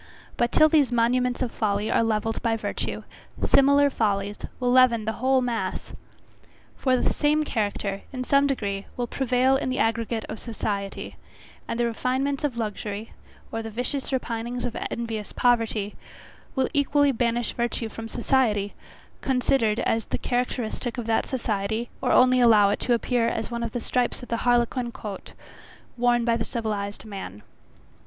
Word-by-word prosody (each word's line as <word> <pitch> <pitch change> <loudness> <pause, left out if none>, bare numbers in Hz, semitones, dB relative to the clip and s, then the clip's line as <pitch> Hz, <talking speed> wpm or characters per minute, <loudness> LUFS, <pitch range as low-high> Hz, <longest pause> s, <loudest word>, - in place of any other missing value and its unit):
But 240 0 +1
till 310 - +6
these 295 -5 +3
monuments 245 +2 +2
of 240 - -3
folly 210 -1 -1
are - - +3
levelled 225 0 0
by 225 -1 +1
virtue, - - -3 0.4
similar 280 +1 +5
follies 205 -3 -1 0.2
will 250 -1 +1
leaven 245 -3 +5
the 220 - 0
whole 260 0 +3
mass. 240 -2 -3 0.8
For 255 -2 +2
the - - +1
same 300 +1 +2
character, 205 -6 -2
in 255 -2 -4
some 280 +2 +3
degree, 200 -7 -2
will 245 - 0
prevail 260 +1 +2
in 265 - -2
the 255 - -1
aggregate 225 0 0
of 215 - -6
society: 205 -4 -4 0.5
and 230 - -3
the 240 - +3
refinements 260 +5 -1
of 275 -5 -1
luxury, 210 -1 -4 0.4
or 225 - -2
the 225 - -6
vicious 250 +5 -2
repinings 245 -1 -2
of 245 - -4
envious 225 -3 -4
poverty, 225 -4 +1 0.6
will 265 - +2
equally 285 0 +3
banish 235 -1 0
virtue 235 -1 -1
from 225 +1 -7
society, 215 -6 +1 0.5
considered 250 -4 +1
as 225 -1 0
the - - -2
characteristic 245 -1 -2
of 240 - -3
that 225 0 +1
society, 220 -2 -2
or - - +1
only 255 0 +5
allow 210 -4 +6
it - - -1
to 245 - +2
appear 235 0 +1
as 225 +1 -2
one 235 0 -3
of 230 -1 -2
the 245 - -2
stripes 245 +1 -1
of - - -10
the 230 - 0
harlequin 240 0 +1
coat, 210 -4 -8 0.6
worn 240 -1 +2
by 235 -1 +3
the 225 - -1
civilized 210 -4 -4
man. 190 - -8
235 Hz, 160 wpm, -25 LUFS, 220-255 Hz, 0.8 s, till